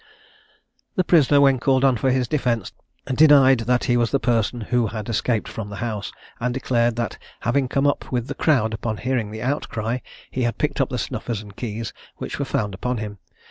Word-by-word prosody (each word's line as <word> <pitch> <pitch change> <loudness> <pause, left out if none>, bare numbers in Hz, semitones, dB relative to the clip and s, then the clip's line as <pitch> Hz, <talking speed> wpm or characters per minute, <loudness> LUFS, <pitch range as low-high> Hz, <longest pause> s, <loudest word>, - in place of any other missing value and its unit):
The 185 - +2
prisoner, 150 -5 +5
when 135 -2 +5
called 130 0 +2
on 130 -2 +4
for 130 +4 +1
his 130 -1 +1
defence, 120 -6 0 0.3
denied 135 -2 +6
that 125 -1 +3
he 120 - +2
was 120 -1 +2
the 140 - +1
person 120 -1 0
who 120 +1 +1
had 105 -1 -5
escaped 115 0 0
from 105 -2 -6
the 100 - -7
house, 105 -2 -4 0.3
and 125 +1 0
declared 120 -3 +1
that 115 -4 -3 0.2
having 130 +3 +1
come 135 +2 0
up 145 - 0
with 120 -2 0
the 145 - -4
crowd 130 -7 +2
upon 110 0 -3
hearing 125 -4 -1
the 110 +1 -6
outcry, 125 -3 -2 0.3
he 130 - -2
had 120 -1 0
picked 150 -1 0
up 135 - +1
the 125 - -3
snuffers 110 -1 -3
and 100 -2 -13
keys, 115 -1 -5 0.2
which - - -5
were - - 0
found 105 -2 -1
upon 125 +6 -2
him. 105 -2 -6
120 Hz, 205 wpm, -23 LUFS, 110-130 Hz, 0.3 s, denied